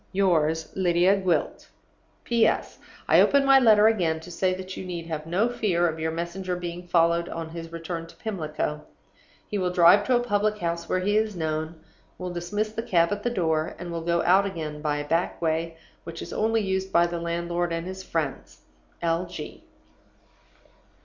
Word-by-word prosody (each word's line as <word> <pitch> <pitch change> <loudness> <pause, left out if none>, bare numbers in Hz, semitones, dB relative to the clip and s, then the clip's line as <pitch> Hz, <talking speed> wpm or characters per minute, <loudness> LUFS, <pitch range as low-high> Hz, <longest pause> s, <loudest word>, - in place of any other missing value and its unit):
Yours, 160 -5 +1
"LYDIA 180 +1 +3
GWILT. 185 -3 -1 0.6
"P.S. 235 -2 +1 0.3
I - - +6
open 280 -1 +4
my 270 0 +7
letter 215 -4 +6
again 175 -8 +2
to 175 - -11
say 185 +2 +1
that 185 0 -7
you - - -6
need 175 -2 -5
have 160 -1 -5
no 190 +7 +2
fear 185 -8 +1
of 160 -1 -3
your 160 0 -1
messenger 170 +3 -3
being 175 0 -6
followed 170 0 +2
on 165 -1 -5
his 165 0 -8
return 165 0 -5
to - - -16
Pimlico. 155 -7 -3 0.7
He 205 - -2
will 180 -1 0
drive 180 +3 +6
to 255 - +4
a - - +4
public 215 -3 0
house 170 -3 -3
where 185 - +1
he 205 +3 +1
is 215 -2 0
known, 160 0 -3 0.4
will 180 -1 -5
dismiss 205 +5 -2
the 225 - -2
cab 170 -6 +2
at 205 0 -2
the 240 - 0
door, 160 -7 -1
and 175 -1 -7
will 165 -1 -3
go 170 +1 0
out 190 +3 +4
again 155 -5 -5
by 150 -1 0
a 145 0 -5
back 165 +3 0
way 165 0 -1 0.3
which 165 0 -7
is - - -8
only 225 +1 +1
used 190 -1 -2
by 170 -1 +4
the 170 0 -3
landlord 170 +1 -2
and 165 0 -3
his 190 +1 -6
friends. 160 -6 -4 0.4
L. 170 +2 0
G." 170 -4 -8
175 Hz, 190 wpm, -26 LUFS, 165-195 Hz, 0.7 s, my